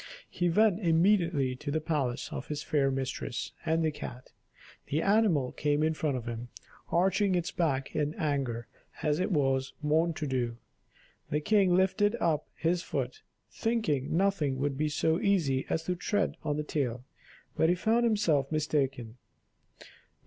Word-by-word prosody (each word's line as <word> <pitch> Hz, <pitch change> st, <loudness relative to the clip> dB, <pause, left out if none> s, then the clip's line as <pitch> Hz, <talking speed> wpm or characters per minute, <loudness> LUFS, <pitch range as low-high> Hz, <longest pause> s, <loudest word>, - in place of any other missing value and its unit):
He 175 Hz, -1 st, 0 dB
went 210 Hz, +2 st, +3 dB
immediately 170 Hz, -6 st, +2 dB
to 145 Hz, -, -6 dB
the 155 Hz, +2 st, 0 dB
palace 145 Hz, -6 st, -2 dB
of 130 Hz, -, -5 dB
his 150 Hz, -1 st, -4 dB
fair 140 Hz, -3 st, +2 dB
mistress 135 Hz, -1 st, -3 dB, 0.2 s
and 160 Hz, 0 st, +2 dB
the 155 Hz, -, +1 dB
cat; 130 Hz, -3 st, -8 dB, 0.6 s
the 150 Hz, -, 0 dB
animal 195 Hz, -, +2 dB
came 150 Hz, 0 st, 0 dB
in 160 Hz, 0 st, +2 dB
front 150 Hz, -4 st, -1 dB
of 120 Hz, -, -6 dB
him, 120 Hz, +1 st, -5 dB, 0.4 s
arching 190 Hz, +2 st, +2 dB
its 175 Hz, +2 st, -1 dB
back 140 Hz, -6 st, -1 dB
in 150 Hz, 0 st, 0 dB
anger 135 Hz, -7 st, -1 dB, 0.4 s
as 150 Hz, 0 st, +1 dB
it 185 Hz, -, 0 dB
was 135 Hz, -4 st, +1 dB
wont 160 Hz, +2 st, +2 dB
to 160 Hz, -3 st, -3 dB
do. 125 Hz, -4 st, -1 dB, 0.7 s
The 150 Hz, -, +1 dB
king 190 Hz, +1 st, +3 dB
lifted 205 Hz, +4 st, +2 dB
up 155 Hz, -6 st, 0 dB
his 170 Hz, +2 st, 0 dB
foot, 435 Hz, -, -4 dB, 0.3 s
thinking 210 Hz, -, 0 dB
nothing 175 Hz, -8 st, +1 dB
would 140 Hz, +1 st, -1 dB
be 150 Hz, +2 st, 0 dB
so 160 Hz, +3 st, +1 dB
easy 155 Hz, -10 st, +1 dB
as 160 Hz, -, 0 dB
to 180 Hz, -, -1 dB
tread 205 Hz, +3 st, 0 dB
on 150 Hz, -1 st, -1 dB
the 150 Hz, -, -1 dB
tail, 125 Hz, -5 st, -2 dB, 0.5 s
but 160 Hz, -, +3 dB
he 175 Hz, -, +4 dB
found 225 Hz, +6 st, +2 dB
himself 170 Hz, -, +2 dB
mistaken. 135 Hz, -6 st, -1 dB
155 Hz, 160 wpm, -30 LUFS, 135-180 Hz, 0.7 s, he